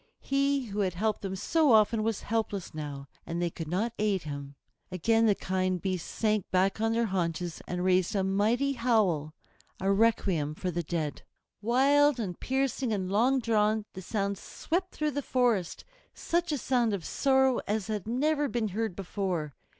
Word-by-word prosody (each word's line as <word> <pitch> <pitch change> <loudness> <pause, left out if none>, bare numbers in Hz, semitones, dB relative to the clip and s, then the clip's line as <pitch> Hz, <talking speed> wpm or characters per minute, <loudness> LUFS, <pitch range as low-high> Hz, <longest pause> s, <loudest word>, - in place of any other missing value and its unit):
He 275 -1 +1
who 210 -2 -5
had 185 -3 0
helped 215 +3 0
them 190 -1 -4
so 300 - +3
often 220 +1 +4
was 220 -1 -1
helpless 215 -4 -2
now, 145 -3 -6 0.2
and 170 +1 -4
they 175 -1 0
could 165 -1 -6
not 205 +8 -1
aid 205 -4 +1
him. 140 -1 -7 0.4
Again 225 +5 +2
the 205 - +4
kind 185 -1 -1
beasts 185 -1 -3
sank 215 -3 0
back 190 +3 +1
on 225 0 +2
their 230 0 +2
haunches 175 -3 -2
and 180 0 -2
raised 185 +1 +2
a 195 - +2
mighty 220 +8 +1
howl, 205 - +1 0.4
a 195 +1 +1
requiem 195 -8 +2
for 180 +2 -3
the 175 +1 -1
dead. 155 -2 -3 0.4
Wild 275 +4 +4
and 185 -6 -4
piercing 265 -2 -1
and 190 -3 -2
long 250 +6 +3
drawn, 215 -2 +1
the 190 - -7
sound 200 0 -2
swept 365 +3 -3
through 305 0 0
the 285 - -2
forest, 240 -10 0 0.3
such 345 0 -1
a 295 - 0
sound 240 -5 +1
of 180 - -7
sorrow 265 -2 +2
as 210 -1 -1
had 210 -3 -4
never 290 +5 +1
been 235 -4 -1
heard 220 -1 -2
before. 180 -6 -3
210 Hz, 175 wpm, -29 LUFS, 185-240 Hz, 0.4 s, often